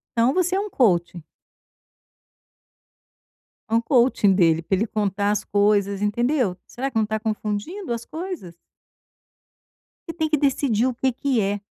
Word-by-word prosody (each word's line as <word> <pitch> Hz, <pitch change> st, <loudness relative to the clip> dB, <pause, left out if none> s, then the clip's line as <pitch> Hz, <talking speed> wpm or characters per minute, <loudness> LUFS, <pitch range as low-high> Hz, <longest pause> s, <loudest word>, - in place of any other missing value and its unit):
Então, 235 Hz, +3 st, +3 dB
você 365 Hz, +1 st, +1 dB
é -, -, +1 dB
um 415 Hz, +1 st, -3 dB
coaching. 175 Hz, -, +1 dB, 2.5 s
É -, -, -4 dB
um 230 Hz, -, +4 dB
coaching 235 Hz, -5 st, +3 dB
dele, 165 Hz, -4 st, +3 dB
pra 180 Hz, +4 st, 0 dB
ele 215 Hz, +5 st, -1 dB
contar 205 Hz, -1 st, -1 dB
as 210 Hz, -, -1 dB
coisas, 200 Hz, -1 st, +1 dB
entendeu? 240 Hz, -1 st, 0 dB
Será, 265 Hz, +3 st, -4 dB
que 230 Hz, -, -3 dB
não 220 Hz, -, +3 dB
tá 215 Hz, +1 st, -2 dB
confundindo 220 Hz, -, -3 dB
as 235 Hz, 0 st, -5 dB
coisas? 320 Hz, -, -7 dB, 1.5 s
E 330 Hz, -, -5 dB
tem 315 Hz, -2 st, -1 dB
que 305 Hz, -, +2 dB
decidir 270 Hz, -5 st, +1 dB
o 255 Hz, -, -1 dB
que 260 Hz, +2 st, 0 dB
que 255 Hz, -1 st, 0 dB
é. 200 Hz, +1 st, -1 dB
225 Hz, 155 wpm, -23 LUFS, 205-275 Hz, 2.5 s, um